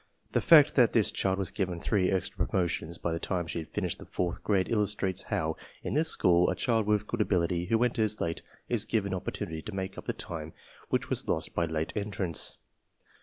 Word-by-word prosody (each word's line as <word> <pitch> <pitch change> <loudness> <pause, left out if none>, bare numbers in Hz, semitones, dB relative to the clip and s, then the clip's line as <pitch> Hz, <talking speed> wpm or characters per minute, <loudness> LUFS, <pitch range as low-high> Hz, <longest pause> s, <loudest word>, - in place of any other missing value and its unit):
The - - +2
fact 155 -3 +7
that 120 -4 +4
this 110 -3 +4
child 95 -1 0
was 95 -3 -1
given 90 -4 -2
three 95 0 +1
extra 95 -2 0
promotions 85 -2 -1
by 85 - -2
the 85 - -2
time 90 0 -1
she 85 - -4
had 80 - -8
finished - - -2
the - - -9
fourth 90 -2 -2
grade 95 -3 +2
illustrates 105 -4 0
how, 80 -6 -1 0.3
in - - -3
this 160 +2 +2
school, 90 0 +4
a - - 0
child 115 -4 +1
with 105 -1 +2
good 120 +1 -2
ability 90 -3 +1
who 115 +5 +2
enters 110 -3 0
late 85 0 -2 0.3
is - - +1
given 100 -3 -1
opportunity 80 -3 -4
to 100 +4 -7
make 95 0 -4
up - - -12
the - - 0
time 80 -2 -5 0.4
which - - -1
was - - -1
lost 80 0 0
by 85 - +1
late 80 0 -2
entrance. 100 -5 -3
95 Hz, 210 wpm, -29 LUFS, 85-105 Hz, 0.4 s, fact